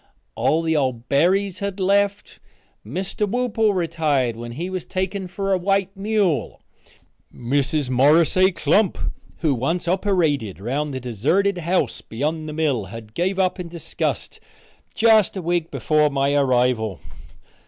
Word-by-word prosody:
All 160 Hz, +2 st, +1 dB
the 160 Hz, -1 st, +1 dB
old 130 Hz, -5 st, -1 dB
Berrys 185 Hz, +6 st, +2 dB
had 200 Hz, -1 st, -4 dB
left. 200 Hz, +1 st, 0 dB, 0.4 s
Mr. 195 Hz, +2 st, -3 dB
Whoople 225 Hz, -3 st, +1 dB
retired 155 Hz, -8 st, 0 dB
when 120 Hz, +1 st, -7 dB
he 165 Hz, +8 st, -4 dB
was 185 Hz, -1 st, -4 dB
taken 190 Hz, 0 st, -3 dB
for 195 Hz, +2 st, -2 dB
a 185 Hz, -, +1 dB
white 195 Hz, +1 st, 0 dB
mule. 195 Hz, -, 0 dB, 0.7 s
Mrs. 135 Hz, +2 st, -1 dB
Morris 145 Hz, +6 st, +4 dB
A. 185 Hz, +1 st, +5 dB
Klump, 190 Hz, +5 st, +2 dB, 0.4 s
who 155 Hz, -4 st, +2 dB
once 165 Hz, +8 st, -1 dB
oppyrated 170 Hz, -, 0 dB
'round 140 Hz, +8 st, -2 dB
the 130 Hz, -, -4 dB
deserted 150 Hz, -, 0 dB
house 170 Hz, -6 st, 0 dB
beyond 155 Hz, +6 st, -3 dB
the -, -, -6 dB
mill 145 Hz, -9 st, 0 dB
had 110 Hz, +2 st, -10 dB
gave 185 Hz, -, -1 dB
up 185 Hz, -1 st, +1 dB
in 180 Hz, -, -5 dB
disgust 170 Hz, -1 st, -4 dB, 0.6 s
just 220 Hz, -3 st, +4 dB
a -, -, -3 dB
week 170 Hz, -1 st, 0 dB
before 150 Hz, -1 st, +2 dB
my 140 Hz, 0 st, 0 dB
arrival. 125 Hz, -7 st, +1 dB
165 Hz, 145 wpm, -22 LUFS, 135-190 Hz, 0.7 s, A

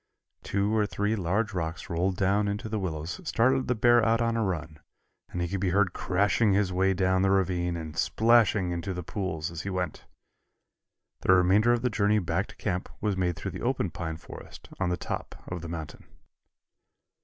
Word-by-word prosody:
Two 100 Hz, +2 st, 0 dB
or 105 Hz, -1 st, +2 dB
three 105 Hz, +2 st, -1 dB
large 100 Hz, +3 st, -1 dB
rocks 80 Hz, -2 st, -3 dB
rolled 90 Hz, +2 st, -1 dB
down 100 Hz, +2 st, +2 dB
into 100 Hz, +2 st, -3 dB
the 110 Hz, 0 st, -2 dB
willows 85 Hz, -, -4 dB
started 130 Hz, -3 st, +2 dB
the 125 Hz, -, +1 dB
bear 120 Hz, +1 st, +5 dB
out 115 Hz, 0 st, +3 dB
on 115 Hz, -1 st, +1 dB
a 115 Hz, -, +1 dB
run 80 Hz, -5 st, -3 dB, 0.5 s
and 90 Hz, -, -3 dB
he -, -, -1 dB
could 100 Hz, +3 st, -3 dB
be 95 Hz, 0 st, 0 dB
heard 95 Hz, 0 st, +2 dB
crashing 100 Hz, +3 st, +2 dB
his 95 Hz, -2 st, +1 dB
way 95 Hz, +1 st, +2 dB
down 95 Hz, 0 st, +2 dB
the 95 Hz, -, +3 dB
ravine 90 Hz, -3 st, +1 dB
and 80 Hz, -1 st, -7 dB
splashing 110 Hz, -2 st, +3 dB
into 90 Hz, +2 st, -3 dB
the 90 Hz, -, -4 dB
pools 85 Hz, -4 st, -3 dB
as 85 Hz, -1 st, -5 dB
he 100 Hz, -, -4 dB
went. 90 Hz, -2 st, -3 dB, 1.1 s
The 95 Hz, -, +4 dB
remainder 95 Hz, +6 st, +4 dB
of 120 Hz, 0 st, +1 dB
the 125 Hz, -, +1 dB
journey 105 Hz, 0 st, +2 dB
back 95 Hz, -5 st, -1 dB
to -, -, -14 dB
camp 90 Hz, +1 st, -3 dB
was 105 Hz, -2 st, 0 dB
made 90 Hz, -2 st, 0 dB
through -, -, -5 dB
the -, -, -7 dB
open -, -, 0 dB
pine 80 Hz, -2 st, -4 dB
forest -, -, -12 dB
on 95 Hz, -, +1 dB
the 90 Hz, -, 0 dB
top -, -, -5 dB
of 90 Hz, -2 st, -5 dB
the 85 Hz, -, -7 dB
mountain. 80 Hz, -2 st, -7 dB
95 Hz, 200 wpm, -28 LUFS, 90-105 Hz, 1.1 s, bear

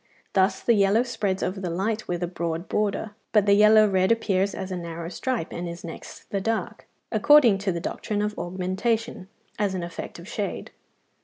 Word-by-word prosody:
Thus 190 Hz, +1 st, +2 dB
the 235 Hz, -, +4 dB
yellow 205 Hz, +2 st, +4 dB
spreads 215 Hz, -6 st, -2 dB
over 190 Hz, +1 st, -2 dB
the 185 Hz, -2 st, -3 dB
light 210 Hz, +6 st, -2 dB
with 175 Hz, 0 st, -2 dB
a -, -, 0 dB
broad 170 Hz, 0 st, -3 dB
border, 210 Hz, +1 st, -1 dB, 0.2 s
but 210 Hz, -2 st, +4 dB
the 200 Hz, -, +5 dB
yellow 215 Hz, +1 st, +7 dB
red 190 Hz, 0 st, +2 dB
appears 200 Hz, -4 st, +1 dB
as 190 Hz, 0 st, -5 dB
a -, -, -2 dB
narrower 170 Hz, -1 st, -6 dB
stripe 240 Hz, -3 st, -3 dB
and 175 Hz, 0 st, -4 dB
is 170 Hz, 0 st, -8 dB
next 165 Hz, -2 st, -9 dB
the 195 Hz, -, -1 dB
dark, 225 Hz, +1 st, -3 dB, 0.2 s
according 235 Hz, -2 st, +6 dB
to 200 Hz, -1 st, -1 dB
the 170 Hz, -, -3 dB
doctrine 205 Hz, +4 st, -3 dB
of 210 Hz, 0 st, -1 dB
augmentation, 190 Hz, +4 st, -2 dB, 0.3 s
as 200 Hz, -2 st, 0 dB
an 180 Hz, -, -3 dB
effect 170 Hz, 0 st, -7 dB
of -, -, -11 dB
shade. -, -, -4 dB
195 Hz, 190 wpm, -25 LUFS, 180-215 Hz, 0.3 s, yellow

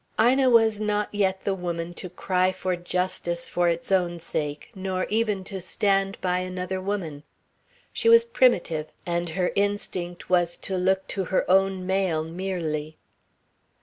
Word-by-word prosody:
Ina 260 Hz, +2 st, +5 dB
was 225 Hz, -3 st, +4 dB
not 210 Hz, -1 st, 0 dB
yet 190 Hz, -2 st, 0 dB
the 200 Hz, -, 0 dB
woman 175 Hz, -2 st, -4 dB
to 180 Hz, -, -7 dB
cry 185 Hz, +1 st, +1 dB
for 185 Hz, -1 st, -2 dB
justice 175 Hz, -1 st, -2 dB
for 175 Hz, 0 st, +1 dB
its 170 Hz, +2 st, -1 dB
own 175 Hz, -2 st, +2 dB
sake, 150 Hz, -3 st, -4 dB
nor 190 Hz, -2 st, -2 dB
even 215 Hz, -3 st, +1 dB
to 190 Hz, 0 st, -5 dB
stand 195 Hz, +1 st, 0 dB
by 180 Hz, -1 st, +1 dB
another 185 Hz, 0 st, -3 dB
woman. 185 Hz, -7 st, -3 dB, 0.7 s
She 460 Hz, -, +2 dB
was 465 Hz, 0 st, +7 dB
primitive, 180 Hz, -, +2 dB, 0.2 s
and 175 Hz, 0 st, -1 dB
her 180 Hz, -1 st, +1 dB
instinct 200 Hz, -3 st, -2 dB
was 175 Hz, -1 st, +2 dB
to 190 Hz, -, -4 dB
look 190 Hz, +1 st, +1 dB
to 190 Hz, -2 st, -2 dB
her 190 Hz, -, +1 dB
own 190 Hz, 0 st, +3 dB
male 190 Hz, -4 st, +1 dB
merely. 165 Hz, -3 st, -3 dB
185 Hz, 150 wpm, -25 LUFS, 175-195 Hz, 0.7 s, was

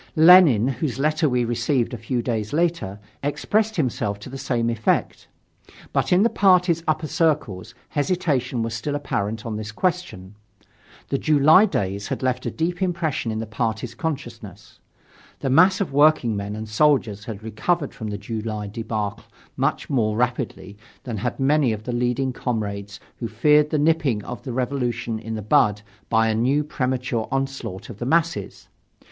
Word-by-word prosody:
Lenin, 160 Hz, -, +7 dB
whose 135 Hz, -1 st, -2 dB
letter 155 Hz, +2 st, +1 dB
we 125 Hz, -1 st, +1 dB
received 120 Hz, +2 st, 0 dB
a -, -, -3 dB
few 120 Hz, +2 st, -2 dB
days 110 Hz, -2 st, -2 dB
later, 165 Hz, -, 0 dB, 0.2 s
expressed 215 Hz, +9 st, 0 dB
himself 115 Hz, -, -1 dB
to 105 Hz, +5 st, -11 dB
the 135 Hz, -, -6 dB
same 120 Hz, -3 st, 0 dB
effect. 115 Hz, -1 st, -1 dB, 0.7 s
But -, -, 0 dB
in 180 Hz, +3 st, +5 dB
the 230 Hz, -, +4 dB
party's 180 Hz, -3 st, +3 dB
upper 155 Hz, 0 st, 0 dB
circles 145 Hz, -, -1 dB
hesitation 140 Hz, -7 st, 0 dB
was 115 Hz, 0 st, -3 dB
still 130 Hz, +6 st, -3 dB
apparent 110 Hz, -6 st, -3 dB
on 110 Hz, -2 st, -3 dB
this 110 Hz, 0 st, -6 dB
question. 110 Hz, -, -3 dB, 0.8 s
The 135 Hz, -, 0 dB
July 155 Hz, +6 st, +6 dB
days 100 Hz, -, -2 dB
had -, -, -4 dB
left 130 Hz, -1 st, -1 dB
a -, -, +1 dB
deep 175 Hz, +3 st, -2 dB
impression 170 Hz, -9 st, -1 dB
in 110 Hz, -, -3 dB
the 115 Hz, -, -3 dB
party's 115 Hz, +1 st, -3 dB
consciousness. 120 Hz, -6 st, -6 dB, 0.6 s
The 135 Hz, -, -1 dB
mass 185 Hz, +6 st, +5 dB
of 195 Hz, -8 st, -2 dB
workingmen 120 Hz, -9 st, +3 dB
and 110 Hz, 0 st, -6 dB
soldiers 110 Hz, -4 st, +1 dB
had 110 Hz, -2 st, -7 dB
recovered 140 Hz, +8 st, -1 dB
from 110 Hz, -, -6 dB
the 105 Hz, -1 st, -4 dB
July 110 Hz, 0 st, -4 dB
debacle 105 Hz, -1 st, -4 dB, 0.3 s
much -, -, -1 dB
more 110 Hz, -5 st, 0 dB
rapidly 120 Hz, -5 st, -2 dB, 0.2 s
than 120 Hz, -4 st, -4 dB
had 120 Hz, +6 st, -3 dB
many 140 Hz, -1 st, +3 dB
of 105 Hz, 0 st, -6 dB
the 125 Hz, -, -4 dB
leading 125 Hz, +2 st, 0 dB
comrades 100 Hz, -5 st, -4 dB, 0.2 s
who 115 Hz, -, -4 dB
feared 150 Hz, +7 st, +3 dB
the 155 Hz, -, 0 dB
nipping 150 Hz, -8 st, +1 dB
of 125 Hz, -4 st, -6 dB
the 130 Hz, -, -6 dB
Revolution 120 Hz, -3 st, -2 dB
in 115 Hz, 0 st, -5 dB
the 110 Hz, -, -5 dB
bud 105 Hz, 0 st, +3 dB, 0.3 s
by 115 Hz, 0 st, +3 dB
a 110 Hz, -, +1 dB
new 130 Hz, +7 st, +2 dB
premature 125 Hz, -5 st, -2 dB
onslaught 135 Hz, -8 st, -3 dB
of 100 Hz, -, -12 dB
the 120 Hz, -, -3 dB
masses. 165 Hz, +2 st, 0 dB
125 Hz, 165 wpm, -23 LUFS, 110-150 Hz, 0.8 s, Lenin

